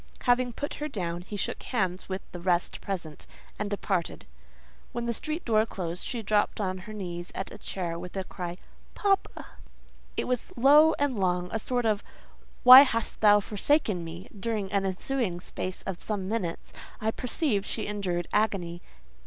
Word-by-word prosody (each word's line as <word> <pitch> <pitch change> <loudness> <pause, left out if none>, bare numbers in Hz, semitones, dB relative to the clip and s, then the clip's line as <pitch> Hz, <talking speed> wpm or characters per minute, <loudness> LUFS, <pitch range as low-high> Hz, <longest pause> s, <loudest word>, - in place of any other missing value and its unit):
Having 245 0 +2
put 285 +5 -4
her 300 - -1
down, 175 - -3
he 205 +3 -7
shook - - -2
hands 190 -7 -2
with 190 0 -3
the 175 - -7
rest 175 0 0
present, 170 -6 -5 0.3
and 205 0 -2
departed. 195 -4 -2 0.7
When 235 0 -2
the 235 - 0
street 310 +8 -2
door 215 -2 +4
closed, 180 -4 -5
she 235 -3 -4
dropped 210 +1 +1
on 185 -2 -1
her - - -5
knees 175 -4 -5
at 195 - -4
a 210 - -10
chair 170 -4 -4
with 180 +2 -7
a 190 - -1
cry—"Papa!" 185 - -3 0.7
It - - 0
was 250 -2 -2
low 295 +6 +7
and 280 -6 0
long; 180 -1 +1
a 225 - -1
sort 245 +2 -1
of 210 -2 +2 0.6
"Why 255 +2 +13
hast 230 -5 0
thou 210 -1 +7
forsaken 210 - +1
me?" 170 +4 -8
During 210 -2 -2
an 200 -1 +1
ensuing 190 -1 -1
space 185 +1 -5
of 190 -2 -5
some 200 -3 -3
minutes, 190 -6 -3 0.3
I 220 +1 0
perceived 225 -4 -1
she 220 - -3
endured 185 -5 -2
agony. 185 -5 0
205 Hz, 170 wpm, -28 LUFS, 180-235 Hz, 0.7 s, Why